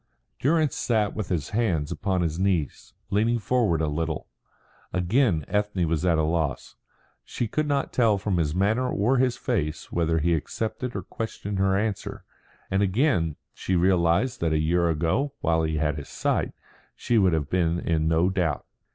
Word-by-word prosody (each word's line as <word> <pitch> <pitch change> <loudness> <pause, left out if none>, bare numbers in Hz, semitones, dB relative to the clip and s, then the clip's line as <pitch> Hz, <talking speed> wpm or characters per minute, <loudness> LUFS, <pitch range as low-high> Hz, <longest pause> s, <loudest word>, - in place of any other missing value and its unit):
Durrance 155 0 +2
sat 110 -4 0
with 105 -4 -4
his 80 -6 -1
hands 95 -10 0
upon 95 -3 -1
his 80 0 -1
knees, 90 -7 -1 0.2
leaning 110 +4 +2
forward 105 -6 +1
a 80 - +1
little. 80 +1 -2 0.7
Again 90 - +1
Ethne 105 -4 0
was 80 +1 -1
at 85 -3 +3
a 80 - +2
loss. 80 -4 -1 0.5
She 120 - -3
could 155 +7 -1
not 140 -1 -1
tell 115 -4 +3
from 95 -2 -1
his 80 -2 0
manner 110 +7 +1
or 120 +6 +2
his 125 -1 +2
face 80 -11 -2
whether 80 -1 +1
he 85 +2 +2
accepted 110 - -3
or 95 - -3
questioned 100 -1 -5
her 95 0 +2
answer; 105 -1 -3 0.5
and 95 +1 +2
again 95 - +1 0.2
she 95 - -2
realised 90 +6 +2
that 80 -2 +1
a - - +2
year 85 +2 +2
ago 85 - 0
while 80 0 +2
he 80 0 -1
had 75 -1 0
his 70 - -10
sight - - -1 0.4
she 120 -2 +1
would 95 -4 +3
have 75 -2 -1
been 85 -2 +1
in 80 -2 0
no 80 +3 +3
doubt. 85 -6 -1
90 Hz, 175 wpm, -25 LUFS, 80-110 Hz, 0.7 s, at